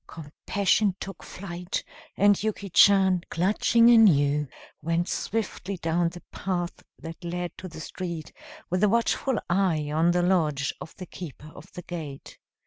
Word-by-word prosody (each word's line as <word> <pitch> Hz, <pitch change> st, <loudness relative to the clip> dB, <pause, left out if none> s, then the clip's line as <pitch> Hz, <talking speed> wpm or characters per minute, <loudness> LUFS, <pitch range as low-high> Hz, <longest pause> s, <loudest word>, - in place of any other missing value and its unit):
Compassion 190 Hz, +5 st, 0 dB
took 195 Hz, -, -7 dB
flight, 180 Hz, -1 st, -5 dB, 0.3 s
and 205 Hz, 0 st, +4 dB
Yuki 205 Hz, -2 st, -3 dB
Chan, 190 Hz, -1 st, +5 dB
clutching 215 Hz, +6 st, +4 dB
anew, 150 Hz, -10 st, +5 dB, 0.3 s
went 165 Hz, +3 st, 0 dB
swiftly 200 Hz, -3 st, -3 dB
down 165 Hz, 0 st, 0 dB
the 175 Hz, +1 st, -12 dB
path 175 Hz, -2 st, -3 dB, 0.2 s
that 165 Hz, +1 st, -9 dB
led 175 Hz, 0 st, -4 dB
to 185 Hz, -, -7 dB
the 160 Hz, -3 st, -10 dB
street, 170 Hz, -1 st, -6 dB, 0.4 s
with 185 Hz, +3 st, +1 dB
a 210 Hz, -, +5 dB
watchful 235 Hz, +3 st, +1 dB
eye 170 Hz, -5 st, +1 dB
on 160 Hz, +3 st, +3 dB
the 175 Hz, 0 st, +2 dB
lodge 155 Hz, -6 st, +1 dB
of -, -, -9 dB
the 185 Hz, -, -8 dB
keeper 155 Hz, -3 st, -10 dB
of 170 Hz, -, -14 dB
the 180 Hz, -, -8 dB
gate. 155 Hz, -6 st, -8 dB
175 Hz, 145 wpm, -26 LUFS, 165-195 Hz, 0.4 s, Chan